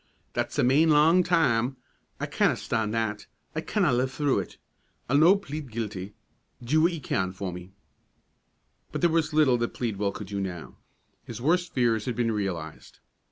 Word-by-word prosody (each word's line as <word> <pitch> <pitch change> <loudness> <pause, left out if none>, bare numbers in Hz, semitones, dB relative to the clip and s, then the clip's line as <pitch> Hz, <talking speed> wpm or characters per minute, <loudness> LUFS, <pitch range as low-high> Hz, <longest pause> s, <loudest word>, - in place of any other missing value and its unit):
That's - - -2
a - - +3
main 145 +6 +4
lang 155 +4 +5
time; 135 -8 +2 0.4
I - - -2
canna - - +1
stan' 110 -2 -2
that; 110 -1 -2 0.3
I 160 - -1
canna 180 - +1
live 130 +2 +1
through 140 +1 +1
it. - - -7 0.5
I'll 140 +3 +3
no' 170 +5 +7
plead 150 - -6
guilty. 105 -3 -5 0.5
Do 150 +7 +2
what 170 +2 +4
ye 165 - -4
can 95 -9 -2
for 95 -1 -5
me." 90 +1 -9 1.2
But - - -4
there 175 - +3
was 165 -1 +1
little 150 -5 +3
that 120 - -2
Pleadwell 105 -4 -1
could 105 - -7
do 100 +1 -4
now. 90 -4 -6 0.5
His - - -8
worst 175 +6 +1
fears 115 -4 +2
had 125 - -2
been 120 -2 0
realized. 95 -7 -5
125 Hz, 175 wpm, -27 LUFS, 105-155 Hz, 1.2 s, no